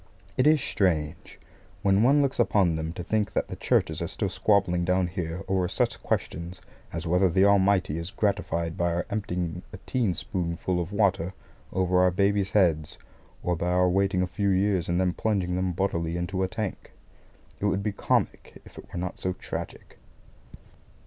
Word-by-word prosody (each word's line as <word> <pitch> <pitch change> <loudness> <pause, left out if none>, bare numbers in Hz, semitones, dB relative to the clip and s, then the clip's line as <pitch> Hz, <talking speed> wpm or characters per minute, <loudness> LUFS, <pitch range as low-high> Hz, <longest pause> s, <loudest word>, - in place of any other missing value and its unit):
It 130 - +3
is 155 0 +6
strange, 80 -5 -1 0.4
when 100 0 +4
one 140 +5 +5
looks 135 -2 -1
upon 100 -7 +3
them, 80 0 -3
to 90 - -6
think 105 +2 0
that - - -1
the - - -5
Churches - - +1
are - - -1
still - - -2
squabbling 95 -4 +2
down 90 +1 +2
here 90 0 -4
over 95 -1 +1
such - - -1
questions 85 +3 -3 0.3
as 85 0 -4
whether 90 +3 +3
the 95 +3 +4
Almighty 100 -5 +3
is 85 - -3
most 115 - -18
gratified 90 -5 0
by 85 0 0
our 85 +1 -1
emptying 90 -4 -2
a - - -8
tea 120 -7 +1
spoonful 90 +1 -2
of 85 +3 -5
water 95 -4 +1 0.4
over 90 -1 +2
our 90 0 +5
babies' 100 +1 +1
heads, 80 -7 +2 0.5
or 90 - +1
by 85 +1 -2
our 90 0 +3
waiting 95 0 +2
a - - +2
few 95 +3 -1
years 95 -2 +1
and 85 +1 +1
then 90 -1 +1
plunging 95 -5 0
them 90 0 0
bodily 85 -2 -1
into 95 +2 -2
a 95 - +2
tank. 105 +1 -5 0.7
It - - -2
would 100 -1 +1
be 105 - 0
comic 100 - -1
if - - -13
it - - -14
were 90 - -4
not 90 0 -4
so 95 - -1
tragic. - - -7
90 Hz, 185 wpm, -27 LUFS, 85-100 Hz, 0.7 s, is